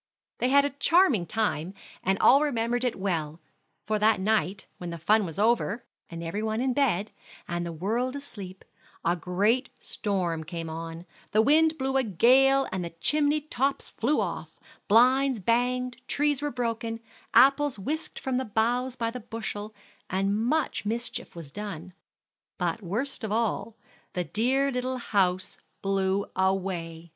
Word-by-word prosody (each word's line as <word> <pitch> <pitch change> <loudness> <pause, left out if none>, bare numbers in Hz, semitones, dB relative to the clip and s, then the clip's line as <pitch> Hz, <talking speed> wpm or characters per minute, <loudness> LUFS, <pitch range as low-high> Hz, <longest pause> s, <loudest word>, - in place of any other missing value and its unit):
They 250 - +2
had 280 +1 +5
a 285 - -1
charming 285 - +3
time, 195 -3 -1 0.3
and 190 +1 +1
all 275 +8 +6
remembered 245 -4 0
it 250 -2 0
well; 165 -5 -2 0.5
for 215 +1 0
that 215 -1 +4
night, 200 -1 0
when 175 - -5
the 170 - -5
fun 205 +5 +3
was 165 - -8
over, 230 +1 +1 0.2
every 170 +4 -4
one 220 0 -1
in 255 0 +1
bed, 220 -7 +1 0.4
and 175 0 -2
the 170 - -4
world 225 - -1
asleep, 200 -10 -9 0.4
a 170 - +3
great 200 +9 +1
storm 180 -6 -2
came 165 0 -6
on; 165 +1 -6 0.3
the 215 - +5
wind 315 +4 +4
blew 270 -1 0
a 265 - +3
gale 265 +6 +4
and 180 -3 -3
chimney 300 - +2
tops 275 -2 -1
flew 280 +7 +1
off, - - -4 0.3
blinds 255 +3 +4
banged, 245 +4 0
trees 290 -1 +1
were 295 - -1
broken, 230 -2 -3 0.4
apples 275 +2 +5
whisked 300 +11 -4
from 260 -1 -2
the 260 - 0
boughs 240 +4 0
by 230 -2 -2
the 250 - -6
bushel, 215 -2 -5 0.4
and 195 +2 +1
much 255 +9 0
mischief 235 +2 -4
was 165 -5 -9
done. 185 -2 -7 0.6
But 175 +2 -1
worst 225 +9 -2
of 215 - -3
all, 225 -1 -1 0.4
the 180 - -1
dear 260 +9 +1
little 255 0 -2
house 190 -5 0 0.3
blew 195 0 +1
away! 185 -3 -1
220 Hz, 150 wpm, -27 LUFS, 190-255 Hz, 0.6 s, all